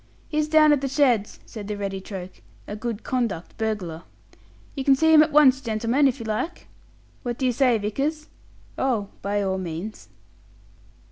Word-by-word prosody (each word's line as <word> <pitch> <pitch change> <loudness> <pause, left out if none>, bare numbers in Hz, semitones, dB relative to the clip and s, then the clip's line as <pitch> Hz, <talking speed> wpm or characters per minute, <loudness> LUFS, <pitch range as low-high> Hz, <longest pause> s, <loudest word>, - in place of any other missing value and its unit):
"He's 305 0 0
down 305 -1 +5
at 285 - +1
the 275 - -1
sheds," 255 -6 +1
said 210 -3 -8
the 210 -1 -4
ready 195 -1 -4
Troke 185 -2 -8 0.2
"a 205 - -6
'good 225 0 -5
conduct' 235 -10 -2
burglar. 200 -7 -3 0.7
You 270 - -4
can 270 0 +5
see 320 +3 +3
him 310 - +9
at 305 0 +2
once, 275 -3 +5
gentlemen, 235 +4 +1
if 265 0 -1
you 230 - -6
like." 220 +11 -3 0.6
"What 240 -2 -4
do 265 - -1
you 255 - +3
say, 245 -1 +3
Vickers?" 275 +9 -2 0.5
"Oh, 230 -7 0
by 205 +1 -1
all 190 -1 -1
means." 170 - -6
235 Hz, 175 wpm, -24 LUFS, 205-275 Hz, 0.7 s, him